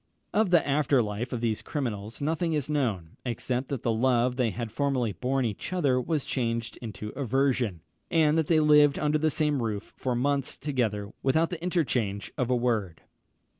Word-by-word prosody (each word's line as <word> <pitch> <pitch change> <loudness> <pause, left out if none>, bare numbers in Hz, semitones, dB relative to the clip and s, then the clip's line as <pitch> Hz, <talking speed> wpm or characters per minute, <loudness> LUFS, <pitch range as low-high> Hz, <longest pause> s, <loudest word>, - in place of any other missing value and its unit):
Of 215 -2 +3
the 175 -4 +4
after 140 -3 +3
life 105 +4 -4
of 120 -3 -3
these 115 -2 0
criminals 115 -6 -4
nothing 160 +3 0
is 150 -1 -1
known, 110 - -1
except 125 +1 -2
that 135 -5 -3
the 115 - +1
love 125 +1 +2
they 125 -3 +1
had 115 +2 -5
formerly 130 -3 0
borne 130 +8 -1
each 110 - -4
other 140 -9 +2
was 150 +2 -1
changed 115 -3 -2
into 105 -2 -6
aversion, 130 - 0 0.3
and 155 -2 +3
that 160 -2 +1
they 160 -2 +4
lived 150 -2 +5
under 150 0 +1
the 155 +1 +2
same 150 -2 +1
roof 110 -3 -4
for 125 -2 -2
months 140 +2 0
together 110 -8 -1
without 160 +6 +2
the 170 -2 -5
interchange 130 - -1
of 125 -1 -1
a 125 - +3
word. 110 -9 -1
130 Hz, 180 wpm, -28 LUFS, 115-150 Hz, 0.3 s, lived